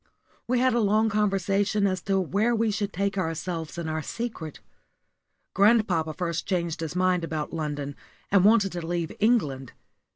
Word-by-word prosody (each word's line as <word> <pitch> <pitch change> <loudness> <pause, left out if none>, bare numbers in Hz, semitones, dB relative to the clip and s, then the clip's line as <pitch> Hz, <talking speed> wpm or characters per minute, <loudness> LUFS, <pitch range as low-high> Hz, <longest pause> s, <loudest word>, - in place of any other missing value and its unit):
We 250 +1 +1
had 255 +1 +3
a 240 - +2
long 215 +1 +3
conversation 200 0 +1
as 185 -2 0
to 195 -1 +2
where 205 +6 +1
we 225 -1 +1
should 205 0 -2
take 200 +2 -1
ourselves 165 -1 -3
and 170 -1 -4
our 155 0 -2
secret. 190 - -5 0.9
Grandpapa 195 -7 +3
first 170 -3 -3
changed 170 -4 -1
his 160 0 -4
mind 180 -1 +2
about 155 -2 -4
London, 145 -3 -3 0.4
and 195 -2 +5
wanted 205 -2 +4
to 175 -1 -5
leave 170 -2 -2
England. 150 - +1
185 Hz, 160 wpm, -26 LUFS, 165-210 Hz, 0.9 s, and